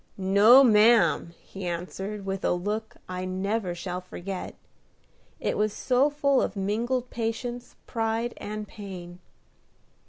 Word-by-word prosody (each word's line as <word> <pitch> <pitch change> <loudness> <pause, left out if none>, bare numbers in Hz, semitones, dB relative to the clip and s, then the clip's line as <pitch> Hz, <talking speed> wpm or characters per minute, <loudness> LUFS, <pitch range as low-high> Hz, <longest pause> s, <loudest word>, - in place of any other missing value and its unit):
"No, 200 +7 +7
ma'am!" 210 -7 +4
he 195 -2 -7
answered, 190 +4 -5
with 195 0 -3
a - - +2
look 210 +5 -3
I 185 0 -4
never 190 +1 -2
shall 180 +1 -4
forget, 185 +1 -6 0.8
it - - -1
was 210 0 +1
so 260 +3 +2
full 285 -2 +2
of - - -2
mingled 235 +6 -1
patience, 240 +1 -4
pride, 225 +1 -1
and 210 0 -6
pain. 180 -4 -9
210 Hz, 125 wpm, -27 LUFS, 185-230 Hz, 0.8 s, No